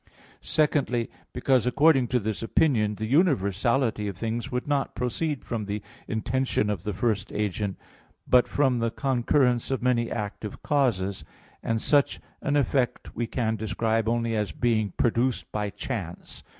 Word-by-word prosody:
Secondly, 135 -6 +1 0.2
because, 125 -1 +2
according 135 0 +4
to 125 - +1
this 110 -1 -3
opinion, 115 -4 +2
the 110 +2 -3
universality 115 - +2
of 100 -3 -5
things 115 +2 -3
would 125 +2 -2
not 145 -2 0
proceed 135 +4 -2
from 115 -3 -3
the 100 0 -4 0.2
intention 115 -1 0
of 100 -5 -3
the 105 - -3
first 105 0 -1
agent, 105 -1 -2 0.5
but 125 -1 +5
from 130 -4 +2
the 115 0 +1
concurrence 125 -1 +1
of 135 -2 -1
many 120 -2 +2
active 105 -1 -5
causes; 100 - +1 0.4
and 115 0 0
such 145 +4 +2 0.2
an 145 - 0
effect 135 -3 0
we 120 0 -1
can 110 -2 -1
describe 110 +1 0
only 115 -1 0
as 105 -5 -1
being 110 +3 +1
produced 120 +1 +1
by 105 -1 -2
chance. 100 -3 -6
115 Hz, 150 wpm, -26 LUFS, 105-130 Hz, 0.5 s, but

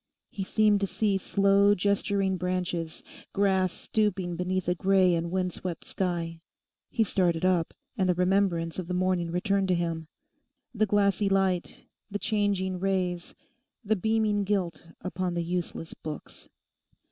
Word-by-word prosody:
He 195 - -4
seemed 210 +1 +3
to 195 - +1
see 200 -1 +1
slow 200 +1 +4
gesturing 200 0 +1
branches, 180 -3 -2 0.3
grass 190 -2 +2
stooping 190 -5 -1
beneath 180 +1 -1
a 180 - +3
grey 185 0 +3
and 170 0 -1
wind 180 0 -1
swept 175 -3 -5
sky. 170 -3 -2 0.5
He 230 - +2
started 180 -4 +1
up; 180 -3 +1 0.2
and 190 -5 +1
the 180 - +3
remembrance 180 -2 +1
of 180 - -4
the 180 - -2
morning 180 -2 +1
returned 195 +3 +1
to 185 - +3
him—the 215 - -4
glassy 200 0 +2
light, 190 -2 0 0.2
the 205 - -2
changing 200 -4 0
rays, 180 -2 -1 0.5
the 220 +2 +2
beaming 215 0 +1
gilt 185 -5 -1
upon 180 0 -2
the 170 - 0
useless 170 -1 -3
books. 155 -2 -8
185 Hz, 140 wpm, -28 LUFS, 175-200 Hz, 0.5 s, slow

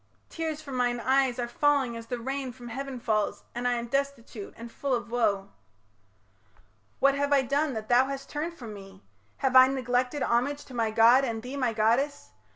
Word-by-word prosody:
Tears 315 -2 -4
from 275 -3 -5
mine 245 -1 +1
eyes 260 0 +2
Are 240 -1 -2
falling 270 -1 +1
as 230 0 -8
the 245 - -3
rain 265 +2 -3
from 240 -1 -11
heaven 270 +1 -5
falls, 215 -3 -1
And 245 +1 -2
I 245 - +2
am 235 -1 -2
destitute 255 -5 -3
and 235 0 -9
full 275 0 -1
of 235 -1 -5
woe. 205 -5 0 1.5
What 275 0 +5
have 285 +1 -1
I 275 -2 +5
done 280 +2 0
that 215 -1 -5
thou 250 +2 +4
hast 275 0 -5
turned 320 +3 -4
from 230 -8 -8
me? 195 -1 -12 0.3
Have 265 -1 0
I 255 0 +10
neglected 255 +1 0
homage 265 +5 0
to 260 - -13
my 230 -2 0
god 230 +4 +6
And 225 -4 -3
thee 255 +3 -6
my 255 -4 0
goddess? 230 - +1
250 Hz, 195 wpm, -28 LUFS, 235-275 Hz, 1.5 s, I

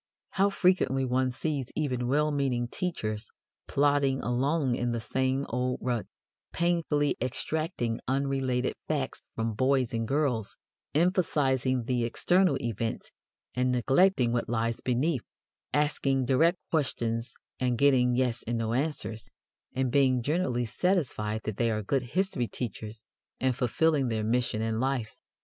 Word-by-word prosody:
How 195 +1 +3
frequently 180 -9 +2
one 130 +1 +1
sees 135 0 -2
even 125 -5 -1
well 150 +3 +2
meaning 130 -4 0
teachers 110 - -3 0.4
plodding 140 -1 +2
along 135 +3 +1
in 120 -1 -1
the 115 - -1
same 130 +4 0
old 125 +1 -1
rut, 120 -3 -2 0.4
painfully 165 -4 +1
extracting 130 -1 -2
unrelated 135 -1 0
facts - - -2
from 115 0 -1
boys 130 +1 +1
and 115 -1 -1
girls, 135 -6 0 0.4
emphasizing 140 -7 +2
the 120 0 0
external 180 +10 +2
events 115 -1 -3 0.4
and 125 0 +1
neglecting 130 +1 +3
what 120 - -1
lies 115 0 -1
beneath, 130 +2 0 0.5
asking 140 -3 +1
direct 165 +8 +3
questions 120 -6 -1 0.2
and 125 -2 +1
getting 125 -3 +4
"yes" 125 -2 0
and 120 0 0
"no" 115 0 -1
answers, 130 -5 -2 0.5
and 130 -1 0
being 130 -3 +3
generally 130 -5 0
satisfied 115 - 0
that 110 -2 -4
they 120 -1 +2
are 110 -1 -1
good 135 +6 +1 0.2
history 190 -11 +1
teachers 110 -2 -6 0.4
and 130 -1 +1
fulfilling 135 +3 +2
their 110 -2 -1
mission 115 -1 0
in 110 0 -1
life. 130 -3 -1
130 Hz, 135 wpm, -28 LUFS, 120-145 Hz, 0.5 s, getting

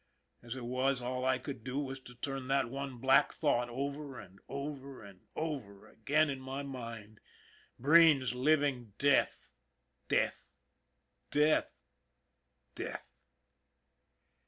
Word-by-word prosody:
As 120 +1 -6
it 125 -2 -6
was, 130 +2 +1
all 125 +1 -3
I 130 0 +3
could 130 -2 -7
do 130 +1 -4
was 135 -2 -3
to 125 -1 -13
turn 135 +1 -4
that 135 -3 +1
one 135 -1 -5
black 135 +2 +4
thought 120 0 +1
over 140 +1 -4
and 100 -2 -13
over 140 -2 -6
and 100 -3 -15
over 135 -11 -4
again 145 +8 +2
in 135 -2 -3
my 135 +1 -5
mind. 115 -5 -7 0.6
Breen's 145 -3 +6
living 130 -4 +1
death, 140 -1 +2 0.6
death, - - 0 0.8
death, 150 +1 +3 1.0
death. - - -6
130 Hz, 120 wpm, -33 LUFS, 120-140 Hz, 1.0 s, Breen's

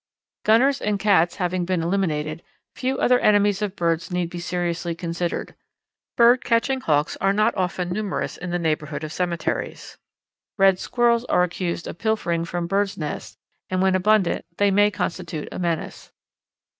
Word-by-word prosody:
Gunners 265 +6 +4
and 210 -1 0
cats 195 -5 +3
having 180 -1 -1
been 175 -1 -1
eliminated, 165 -4 -1 0.3
few 260 +1 -2
other 250 -1 +3
enemies 205 -1 +3
of 205 -2 -2
birds 165 -2 0
need 180 -2 -2
be 175 - -5
seriously 175 -1 -2
considered. 170 0 -3 0.6
Bird 240 +2 +5
catching 250 +3 +1
Hawks 150 -6 +1
are 195 +1 +2
not 215 +1 +2
often 180 -1 -2
numerous 205 0 -2
in 180 - -7
the 175 - 0
neighbourhood 155 -3 -2
of 155 0 -5
cemeteries. 175 -1 -3 0.6
Red 195 -2 +4
squirrels 235 -1 +2
are 180 - +3
accused 175 -1 -3
of - - -7
pilfering 175 -7 0
from 175 0 -3
birds' 195 +2 0
nests, 110 -8 -5 0.3
and 185 - -1
when 190 0 +3
abundant 190 0 +2
they 205 -1 +3
may 205 +1 +4
constitute 175 -5 -4
a - - -6
menace. 170 -2 -3
180 Hz, 155 wpm, -23 LUFS, 170-205 Hz, 0.6 s, Bird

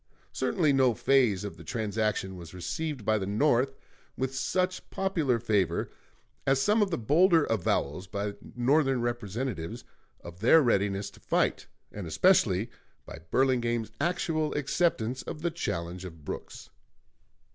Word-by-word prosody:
Certainly 155 -7 +1
no 130 -3 +3
phase 120 -9 +3
of 100 - -6
the - - -11
transaction 105 -4 -2
was 85 -1 -10
received 140 - -4
by 110 0 +2
the 95 - -3
North 130 +4 +2 0.4
with 130 0 -2
such 185 +7 -1
popular 165 -10 0
favor 100 -7 0 0.6
as 135 0 +4
some 210 +10 +3
of 205 - +2
the 165 - -1
bolder 160 - +4
avowals 90 - -1
by 100 +2 -3 0.2
Northern 135 +1 +2
Representatives 120 -2 -3 0.4
of 85 0 -11
their 160 +9 +6
readiness 100 -4 +1
to - - -17
fight, - - 0 0.2
and 100 -4 -6
especially 110 - +3 0.3
by - - -9
Burlingame's 120 -4 +1
actual 155 -2 0
acceptance 135 -5 0
of 150 - -7
the 170 - +1
challenge 90 - -4
of 80 -5 -10
Brooks. - - -7
120 Hz, 135 wpm, -28 LUFS, 100-150 Hz, 0.6 s, their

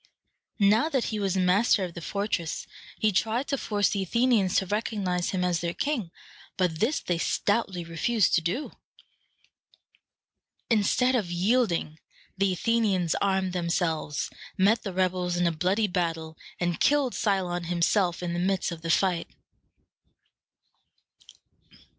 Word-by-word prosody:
Now 215 +8 +4
that 265 -6 0
he 215 - -1
was 195 -2 0
master 190 +3 +3
of 180 -2 -5
the 170 - -8
fortress, 200 -3 -2 0.3
he 215 - +2
tried 225 +7 0
to 275 - +1
force 205 -2 +1
the 200 - -1
Athenians 220 -1 +2
to 190 - +3
recognize 195 -3 -1
him 185 -2 -1
as 175 -2 +1
their 170 0 -3
king, 275 - -2 0.5
but 175 -4 0
this 275 +9 +1
they 175 -2 -2
stoutly 200 -2 0
refused 180 +7 +1
to 170 - +4
do. 185 - -2 2.0
Instead 230 +4 +3
of 215 -8 0
yielding, 175 -4 +1 0.4
the 195 0 +1
Athenians 190 -3 +1
armed 190 -2 +1
themselves, 170 -4 -1 0.3
met 205 +5 +3
the 195 - -5
rebels 180 -1 0
in 175 - +1
a 170 - +3
bloody 185 +7 +1
battle, 165 -4 -2 0.2
and 175 -1 -1
killed 285 -4 +2
Cylon 180 -4 -1
himself 175 +1 +1
in 170 -1 -2
the 175 - -2
midst 190 0 0
of 165 -1 -7
the 165 - -5
fight. 180 0 +1
185 Hz, 140 wpm, -27 LUFS, 175-215 Hz, 2.0 s, Now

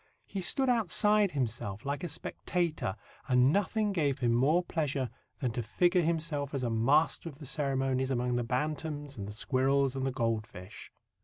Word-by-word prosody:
He 195 - -5
stood 265 +8 +3
outside 210 -3 +3
himself, 115 -4 -3
like 140 +2 -2
a - - -1
spectator, 165 - -2 0.3
and 125 +2 +4
nothing 205 +1 +1
gave 145 -7 +1
him 120 -1 +1
more 150 +9 +3
pleasure 145 -7 -2 0.3
than 125 -3 0
to 120 - -2
figure 175 - +2
himself 155 -4 -1
as 135 - -2
a 120 - 0
master 140 +9 +2
of 140 - -13
the 150 - -10
ceremonies 135 -2 0
among 125 -1 0
the 120 0 0
bantams, 145 +3 -3
and 100 -2 -6
the - - -6
squirrels 135 +4 +1
and 135 - -2
the 135 - 0
goldfish. 110 -6 -4
140 Hz, 170 wpm, -31 LUFS, 125-165 Hz, 0.3 s, and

